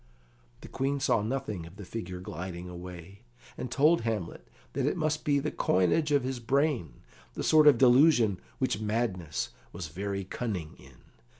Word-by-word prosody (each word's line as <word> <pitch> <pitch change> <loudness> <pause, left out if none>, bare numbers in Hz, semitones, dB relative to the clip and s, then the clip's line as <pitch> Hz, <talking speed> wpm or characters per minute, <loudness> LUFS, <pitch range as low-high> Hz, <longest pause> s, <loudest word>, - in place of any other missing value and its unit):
The - - -10
Queen 135 +1 -1
saw 125 -5 +2
nothing 105 -7 -3
of 85 - -14
the 100 -1 -9
figure 90 -3 -6
gliding 90 0 -6
away, 90 +2 -9 0.3
and 125 - -5
told 155 +3 +4
Hamlet 110 -7 -4 0.3
that 135 0 0
it 150 - 0
must 155 -1 0
be 145 -1 +2
the 145 +2 -1
coinage 95 - +2
of 140 -3 +3
his 130 -1 -3
brain, 125 - 0 0.3
the - - -3
sort 155 -1 +6
of 140 -5 +8
delusion 125 - +5 0.2
which 130 -6 0
madness 105 -8 -2 0.2
was 85 -4 -6
very 100 +4 -3
cunning 95 -5 -4
in. 65 -2 -16
110 Hz, 165 wpm, -29 LUFS, 90-135 Hz, 0.3 s, of